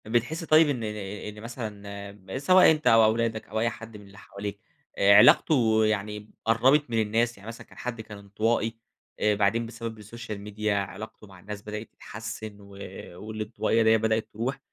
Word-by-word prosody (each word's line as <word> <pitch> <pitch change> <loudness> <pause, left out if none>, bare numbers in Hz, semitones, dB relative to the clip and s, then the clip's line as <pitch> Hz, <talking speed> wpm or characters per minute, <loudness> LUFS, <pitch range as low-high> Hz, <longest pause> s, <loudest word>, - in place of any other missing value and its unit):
بتحسّ 120 +9 -1
طيب 155 -1 +5
إن 135 -4 -1
ن - - -5 0.5
إن - - -10
مثلًا، 100 -4 -7
م 95 0 -8
سواء 185 +5 +6
أنت 155 -1 0
أو 115 0 +7
أولادك 110 0 +1
أو 110 +2 -3
أي 115 +1 +2
حد 115 -1 -10
من 105 - -14
اللي 100 +1 -16
حواليك، 100 0 -7 0.4
آآ، 100 +1 +6
علاقته 110 0 +5
يعني 105 0 -2 0.2
قرّبت 130 +6 +3
من 115 -1 +1
الناس، 115 +2 0
يعني 100 +2 -14
مثلًا 115 0 -9
كان - - -19
حَدّ 120 -2 -5
كان 110 -1 -10
انطوائي، 110 +3 -1 0.4
آآ 105 -1 +2
بعدين 105 +3 +1
بسبب 115 -1 -7
السوشيال 110 +1 -8
ميديا 105 0 -2
علاقته 105 +2 -6
مع 95 -2 -15
الناس 100 +2 -8
بدأت 105 +1 -7
تتحسن 110 -1 -8
و 100 - -15 0.5
والانطوائية 110 +3 -1
دية 110 0 +5
بدأت 110 0 0
تروح، 125 +6 -3
110 Hz, 180 wpm, -26 LUFS, 105-115 Hz, 0.5 s, أو